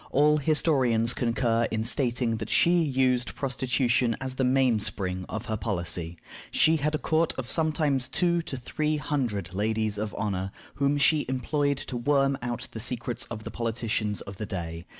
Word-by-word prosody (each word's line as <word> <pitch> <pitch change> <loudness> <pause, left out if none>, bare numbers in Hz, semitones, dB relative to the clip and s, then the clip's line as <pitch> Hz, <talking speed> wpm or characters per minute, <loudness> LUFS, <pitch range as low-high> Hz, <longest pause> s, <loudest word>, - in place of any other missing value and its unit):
All 150 +2 +4
historians 135 -7 +3
concur 115 -1 +1
in 110 -1 -1
stating 120 -1 0
that - - -5
she 175 0 +4
used 130 - +1
prostitution 125 -3 +1
as 130 -1 -4
the 130 - -1
mainspring 110 -8 +1
of 110 +1 -4
her 110 -1 -2
policy. 85 -5 -3 0.3
She 160 +1 +4
had 150 +1 0
a - - +1
court 160 +2 +1
of 130 -2 -4
sometimes 155 -5 +1
two 170 +4 +1
to 150 -5 -6
three 150 +5 -1
hundred 120 - -2
ladies 110 +1 -1
of 105 0 -3
honor, 95 -2 -2 0.2
whom 140 +1 +1
she 150 +1 +3
employed 140 +2 0
to 130 -2 -5
worm 135 +2 +2
out 120 -1 -3
the 110 - -6
secrets 120 0 -3
of 110 -2 -7
the - - -6
politicians 115 -3 -2
of 100 -1 -9
the 105 - -5
day. 85 -3 -5
125 Hz, 170 wpm, -27 LUFS, 110-140 Hz, 0.3 s, All